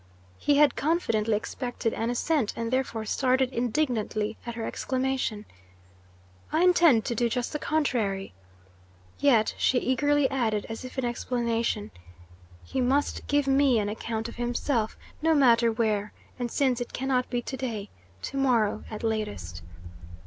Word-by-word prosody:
He 290 - +3
had 295 -1 +5
confidently 230 -9 +1
expected 240 +1 -3
an 225 - -2
assent, 245 0 0
and 230 +1 -3
therefore 235 -4 -1
started 260 +2 +1
indignantly 230 -4 -1
at 235 - -4
her 230 -1 -4
exclamation: 260 -5 -2 1.1
"I 320 +3 +2
intend 340 -10 +5
to - - -1
do 235 +1 +1
just 245 +2 -2
the 300 - -2
contrary." 225 - -1 0.9
Yet 235 -7 +4
she 260 - +3
eagerly 290 +3 +2
added, 225 -6 0
as 225 +2 -6
if 255 +1 -9
in 260 - 0
explanation: 235 -3 -1 0.7
"He 265 - -2
must 270 +4 0
give 290 -1 +2
me 270 -2 +4
an 205 -1 0
account 225 +1 -3
of 235 - -10
himself, 240 -1 -1 0.2
no 320 +1 +3
matter 235 -4 +5
where, 215 -2 -1 0.3
and, 245 -1 -2
since 260 -2 +1
it 240 - -5
can 265 - -3
not 255 -2 +1
be 240 -1 -2
to 265 - -5
day, 230 -6 -4 0.3
to 275 - -4
morrow 235 -6 +2
at 215 0 -7
latest." 100 - -3
240 Hz, 150 wpm, -27 LUFS, 220-270 Hz, 1.1 s, had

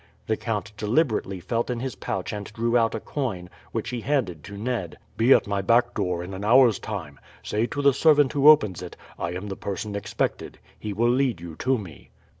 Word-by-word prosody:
The 110 - +1
count 110 -3 -3
deliberately 110 - 0
felt 115 +8 -2
in 125 -1 -2
his 130 0 -3
pouch 95 -1 -4
and 105 -1 -5
drew 115 +1 0
out 115 -2 +3
a - - -2
coin, 100 -11 -4 0.2
which - - -3
he 120 -2 -3
handed 110 - -1
to 100 -1 -9
Ned. 110 -6 -3 0.2
"Be 115 +4 +3
at - - +6
my 100 -1 -1
back 120 +4 +3
door 90 -1 -1
in 95 +2 -7
an 95 +2 -6
hour's 120 -1 +5
time. - - -6 0.2
Say 110 +3 0
to 145 - -4
the 140 -1 +6
servant 145 -1 +4
who 145 0 +6
opens 105 - +5
it, - - -9 0.2
'I 85 0 -2
am 95 +3 -5
the 95 - -4
person 100 +2 -5
expected.' 100 -1 -3 0.2
He 105 - -4
will 115 +4 +2
lead 125 -6 +1
you 85 -2 -8
to 130 +1 +1
me." 95 -8 -10
110 Hz, 215 wpm, -25 LUFS, 95-125 Hz, 0.2 s, at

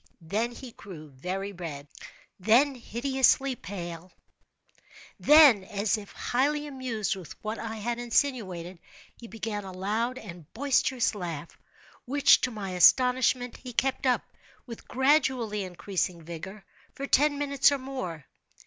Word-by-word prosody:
Then 215 +9 -1
he 245 +1 -10
grew 160 -9 -11
very 185 +9 -4
red—then 180 - -1
hideously 265 +2 +1
pale—then, 195 - +1
as 205 +1 0
if 210 -2 -8
highly 290 +4 0
amused 255 -8 -3
with 185 -4 -9
what 215 +1 -4
I 225 -1 -5
had 235 +2 -3
insinuated, 210 -9 -1 0.4
he 235 - -12
began 215 -1 -5
a 190 - -8
loud 215 +7 -2
and 175 - -11
boisterous 260 -2 +1
laugh, 170 -6 -6 0.5
which, 280 +3 +5
to - - 0
my 205 -5 -6
astonishment, 250 +6 +4
he 250 -1 -9
kept 265 +2 0
up, 250 - +2 0.4
with 230 -2 -10
gradually 260 -6 +1
increasing 180 -1 -3
vigor, 170 +5 -8 0.3
for 275 - -4
ten 285 +1 +3
minutes 280 -1 +3
or 285 - +1
more. 255 - -6
225 Hz, 125 wpm, -28 LUFS, 185-260 Hz, 0.5 s, which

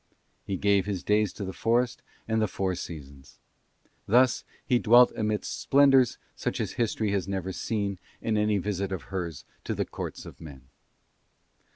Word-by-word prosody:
He 95 - -1
gave 100 0 +2
his 95 -4 -3
days 105 -1 +2
to 100 - -5
the 95 - -5
forest 120 +2 +1 0.3
and 110 0 +1
the 110 - +2
four 95 0 -1
seasons. 70 -6 -9 0.7
Thus 125 +4 +4 0.2
he 125 - +3
dwelt 120 +2 +6
amidst 105 -1 -2
splendours 135 -3 +5 0.2
such - - -3
as - - -2
History 110 -3 -1
has 95 -3 -1
never 95 -1 -3
seen 100 -1 -2 0.2
in 110 - -1
any 105 0 +2
visit 100 0 -2
of 95 - -4
hers 85 -6 -4 0.2
to - - -3
the - - -1
courts - - -6
of - - -12
men. 70 -5 -10
100 Hz, 165 wpm, -27 LUFS, 95-110 Hz, 0.7 s, dwelt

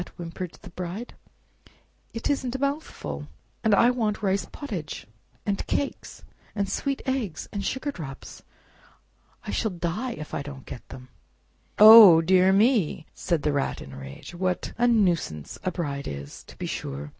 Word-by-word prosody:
whimpered 175 0 -6
the - - -11
Bride; 185 +7 -6 1.0
"it 230 - -4
isn't 265 -3 -1
a - - +1
mouthful; 275 - -3 0.4
and 220 -2 +4
I 240 +4 +5
want 220 -4 -1
rice 195 0 +1
pottage, 190 - -6 0.4
and 200 -1 -1
cakes, 285 - -3 0.3
and 200 -1 0
sweet 275 +7 -2
eggs, 245 - -2
and 200 -1 -3
sugar 265 +6 -2
drops. 135 - -9 1.0
I - - -4
shall 220 - 0
die 180 +8 -3
if 155 -6 -9
I - - -2
don't 140 -2 -9
get - - -10
them!" 130 -1 -11 0.7
"Oh, 215 -5 +11
dear 185 +3 +4
me!" 200 - +2 0.2
cried 165 -5 +1
the 150 - +1
Rat 140 -1 -1
in 70 - -10
a - - -9
rage, 70 - -10
"what 180 0 -2
a 240 +1 +2
nuisance 175 - +1
a 185 - +1
bride 145 -6 -4
is, 70 0 -7
to - - -15
be - - -4
sure! 70 +2 -5
185 Hz, 160 wpm, -26 LUFS, 150-230 Hz, 1.0 s, Oh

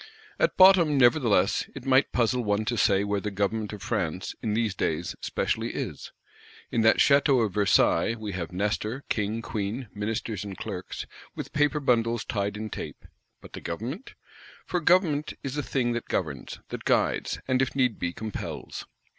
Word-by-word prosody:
At - - +2
bottom, 185 -6 +7
nevertheless, 120 -7 +3
it 135 -1 -8
might 135 +1 +4
puzzle 120 +1 +1
one 105 0 0
to 120 - 0
say 100 -2 +3
where 100 -1 -1
the 105 - -2
Government 105 +2 -1
of 105 -2 -8
France, 95 -5 -2
in 105 -2 -1
these 110 -2 +1
days, 85 -1 -2
specially - - -2
is. - - -5 0.6
In 115 - +1
that 110 0 +5
Château 140 -4 +4
of 100 - -4
Versailles, 100 0 +3
we 110 -2 -5
have 90 -2 -4
Nestor, 105 +7 -2
King, 110 +2 -1
Queen, 110 +3 -3
ministers 105 -1 -3
and 100 -3 -7
clerks, - - -5 0.3
with - - -6
paper 150 0 +2
bundles 115 -4 +1
tied 100 -3 -2
in 110 0 -5
tape: - - -7 0.4
but - - -14
the - - -7
Government? 125 - -5 0.5
For 180 - -1
Government 165 -3 +2
is 135 0 -4
a 150 - 0
thing 130 -3 0
that 120 0 -3
governs, 75 -7 -3
that - - -6
guides; - - +1
and 130 0 +2
if 130 - -1
need 125 -5 +1
be, 85 - -1
compels. 110 +3 -6
110 Hz, 170 wpm, -27 LUFS, 100-130 Hz, 0.6 s, bottom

